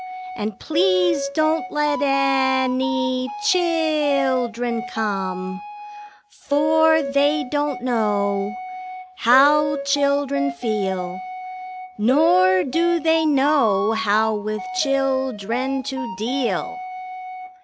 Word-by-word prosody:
And 210 - -5
please 185 - +1
don't 320 +4 0
let 295 0 0
any 260 -2 0 0.2
chil 375 -4 +3
i 295 -7 +1
il - - -3
dren 235 +1 -4
come, 195 -3 -4 0.9
For 315 +2 +3
they 280 +3 +1
don't 290 -4 -2
know 200 -5 -1 0.7
How 285 +4 +4
children 280 - 0
feel, 190 -1 -3 0.8
Nor 185 - +3
do 345 +5 0
they 320 -1 +2
know 265 -8 +2
how 220 0 +1
with 215 - -4 0.2
chil 270 -2 0
dren 255 +6 -3
to 240 -4 -5
deal. 255 +10 -2
260 Hz, 90 wpm, -21 LUFS, 215-290 Hz, 0.9 s, How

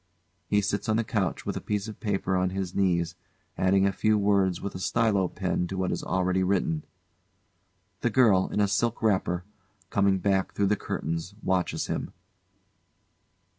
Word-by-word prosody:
[He 105 +2 +3
sits 100 +2 -2
on 110 - +3
the 115 - +1
couch 105 -6 -2
with - - -2
a - - -4
piece 105 0 -2
of 110 - -8
paper 95 -3 -1
on 90 0 +2
his 95 -1 -4
knees, 85 -3 +1 0.4
adding 95 +1 +3
a 100 - +3
few 110 +2 +2
words 100 -3 +2
with 100 - -5
a - - -6
stylo 100 -1 +2
pen 90 -2 -2
to 95 - -5
what 95 -1 0
is - - -3
already 95 0 +1
written.] 100 - +1 1.2
[The 120 - +1
GIRL, 105 -6 +4
in - - -1
a 100 - +3
silk 110 +4 0
wrapper, 95 -4 +1 0.5
coming 100 -1 +3
back 95 0 0
through 100 - +1
the - - +2
curtains, 85 +1 -4
watches 95 -1 0
him. - - -4
95 Hz, 170 wpm, -27 LUFS, 95-105 Hz, 1.2 s, GIRL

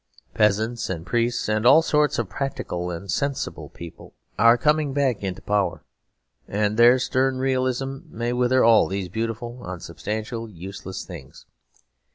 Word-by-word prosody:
Peasants 110 +3 +1
and 85 -3 -4
priests 120 +3 0
and 105 0 0
all 145 +7 +7
sorts 150 -2 +2
of - - -1
practical 90 -10 -4
and 90 +2 -5
sensible 140 - -2
people 85 -1 -12 0.2
are 115 +2 +6
coming 150 +1 +1
back 135 -5 +1
into 95 -1 -4
power, 105 -2 0 0.6
and 105 +1 0
their 120 +2 +7
stern 130 +1 0
realism 130 +1 -1
may 120 +2 -3
wither 125 +1 +3
all 115 -1 +6
these 95 -1 -3
beautiful, 115 +4 -4
unsubstantial, 105 +6 -5
useless 95 0 -8
things. 80 -8 -11
115 Hz, 140 wpm, -24 LUFS, 100-130 Hz, 0.6 s, all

